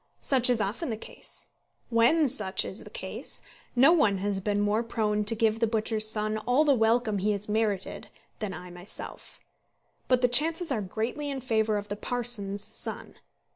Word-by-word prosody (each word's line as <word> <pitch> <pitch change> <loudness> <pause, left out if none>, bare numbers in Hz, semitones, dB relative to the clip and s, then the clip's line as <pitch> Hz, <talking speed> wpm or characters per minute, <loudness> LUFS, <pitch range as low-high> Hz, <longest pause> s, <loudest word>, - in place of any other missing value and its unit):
Such 255 -3 +3
is 245 -2 +3
often 215 - -2
the 220 - -2
case. - - -9 0.4
When 240 +7 +4
such 215 -7 +2
is - - -5
the - - -11
case, - - -5 0.3
no 270 +7 +7
one 220 - +3
has 195 0 -2
been 205 +1 0
more 205 +2 +2
prone 215 -2 0
to 225 +2 +4
give 225 0 +2
the 230 - +2
butcher's 215 -1 0
son 215 0 0
all 245 +7 +3
the 285 - +5
welcome 225 -2 +2
he 210 +2 +1
has 200 +1 -2
merited 210 -3 -1 0.3
than 210 -3 -3
I 180 0 -8
myself; 180 +3 -9 0.7
but 255 -1 +3
the - - +7
chances 320 +6 +2
are 230 -5 0
greatly 230 +9 -3
in 275 -1 -3
favour 220 -4 +1
of 205 0 -5
the 205 - -2
parson's 210 -4 -2
son. - - -6
220 Hz, 180 wpm, -28 LUFS, 205-245 Hz, 0.7 s, no